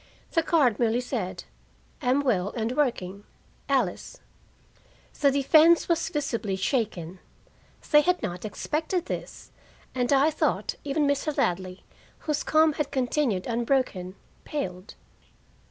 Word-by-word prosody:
The 330 - +3
card 285 -10 +2
merely 235 0 +2
said: 245 -7 -4 0.6
"Am 260 +1 +2
well 205 -8 0
and 225 +1 -1
working. 205 -9 -1 0.5
ALICE." 250 -10 -1 1.0
The 285 - +5
defense 310 +5 +5
was 335 -2 +1
visibly 230 -9 -2
shaken. 190 - -2 0.7
They 295 -1 +8
had 360 0 0
not 180 -4 -4
expected 320 - -2
this, - - -7 0.4
and 245 0 0
I 280 +3 +4
thought 310 - 0
even 290 +1 0
Mr. 285 +1 0
Ladley, 185 +1 -1 0.4
whose 300 -2 -1
calm 315 0 +3
had 290 -1 -2
continued 255 -6 0
unbroken, 235 -6 -1 0.3
paled. 185 -10 -5
255 Hz, 120 wpm, -26 LUFS, 200-295 Hz, 1.0 s, They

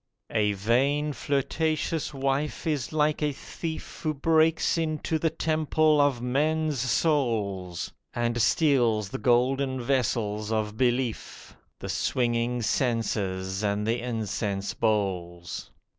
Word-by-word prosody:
A 105 -2 +2
vain, 135 +9 +1
flirtatious 155 +3 -1
wife 140 +3 -1
is 150 -5 -1
like 150 0 +1
a 150 -1 +1
thief 160 +3 -7
Who 155 -1 -1
breaks 160 +2 +3
into 160 -1 -1
the 160 - +2
temple 155 -1 +2
of 135 -4 +1
men's 150 +3 +1
souls, 115 - 0 0.2
And 120 0 0
steals 120 - +3
the - - -5
golden 130 +3 +2
vessels 110 -4 0
of 110 -1 -1
belief, 120 -1 -1 0.2
The - - -7
swinging 120 -1 0
censers, 100 -6 -1
and 105 0 0
the 115 +2 +1
incense 105 -4 -2
bowls. 90 -5 -2
125 Hz, 115 wpm, -27 LUFS, 110-150 Hz, 0.2 s, breaks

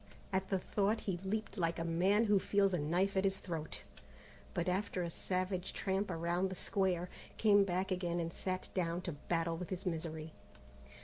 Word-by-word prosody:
At 190 0 +1
the 195 - +2
thought 205 +3 +1
he 190 -3 -1
leaped 215 +1 -2
like 165 -1 +1
a 165 - -1
man 185 +6 +3
who 205 -2 +5
feels 195 0 +3
a 180 - +2
knife 180 +7 +1
at 190 - +3
his 195 -1 +3
throat, 165 -5 -4 0.7
but 175 - 0
after 185 0 0
a 170 - -3
savage 185 +1 -1
tramp 195 +1 0
around 175 +2 0
the 190 - -5
square, 180 -2 +1 0.3
came 205 -2 +6
back 190 0 -1
again 175 -2 0
and 165 0 -2
sat 185 -1 -3
down 175 -1 0
to 175 - -3
battle 165 +2 -1
with 180 0 -5
his 185 +1 -4
misery. 160 -2 -3
185 Hz, 185 wpm, -36 LUFS, 170-195 Hz, 0.7 s, came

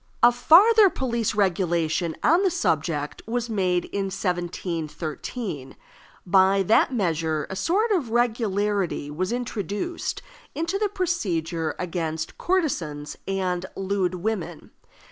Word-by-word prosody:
A 240 - +8
farther 400 - +6
police 235 - -1
regulation 175 -4 +1
on 335 +4 +5
the 390 - +3
subject 155 - -1
was 240 0 -2
made 185 -4 +1
in 200 -1 -3
1713. 175 - -4 0.5
By 190 +1 +4
that 215 +7 +4
measure 165 - 0
a - - -3
sort 390 - +1
of 330 - +1
regularity 210 - 0
was 185 +7 -2
introduced 240 - -3 0.3
into 335 +5 -1
the 420 -1 +1
procedure 180 - -1
against 160 -3 -4
courtesans 165 - -1
and 185 -2 -1
lewd 190 -2 -1
women. 200 0 -4
195 Hz, 110 wpm, -25 LUFS, 170-245 Hz, 0.5 s, A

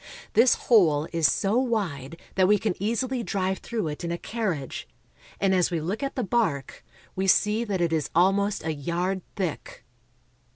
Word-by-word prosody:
This 235 +3 +5
hole 160 -10 +3
is 165 -2 +3
so 205 +5 +1
wide 170 - -2
that 185 -1 +3
we 210 +1 +5
can 205 -1 -1
easily 240 +4 -1
drive 190 -3 -1
through 225 -7 -3
it 150 +3 -6
in 170 - -2
a 170 - -2
carriage, 185 - -4 0.5
and 195 -1 +2
as 180 -2 +3
we 170 -2 -1
look 185 - -3
at 275 -1 -3
the 255 - -1
bark, 190 - -1 0.3
we 190 +1 -1
see 210 +4 +3
that 195 -4 -2
it 170 -1 +1
is 155 -2 0
almost 195 +2 +2
a 160 - 0
yard 175 +6 -2
thick. 185 -7 -4
190 Hz, 175 wpm, -26 LUFS, 165-215 Hz, 0.5 s, This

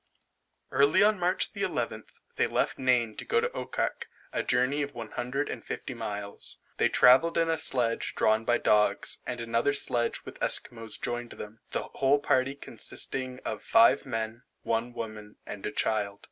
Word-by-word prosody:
Early 140 +7 +4
on 210 -1 +3
March 180 +1 +1
the - - -6
11th, - - -2 0.3
they - - +2
left - - -1
Nain 125 -4 +2
to - - -4
go 460 - +1
to 470 +1 0
Okkak, - - -3 0.3
a - - 0
journey 125 +4 +1
of 145 0 -4
150 125 +4 -4
miles. 105 -3 -6 0.2
They - - +3
travelled 135 +7 +5
in 165 0 +2
a 160 - 0
sledge 120 -6 +1
drawn 110 +1 +2
by 120 +1 +2
dogs, 105 0 +2
and 120 0 -4
another 115 +4 +1
sledge 120 -4 0
with - - -10
Esquimaux 115 -2 -1
joined 120 0 -4
them, 105 +1 -9
the - - -2
whole 140 +1 +2
party 135 -1 +1
consisting 130 -2 -2
of 110 -2 -3
five 225 - +5
men, 115 -1 -3 0.2
one 115 +2 -1
woman, 110 -3 -7
and 100 - -6
a - - -3
child. 105 -2 -1
120 Hz, 160 wpm, -28 LUFS, 110-140 Hz, 0.3 s, travelled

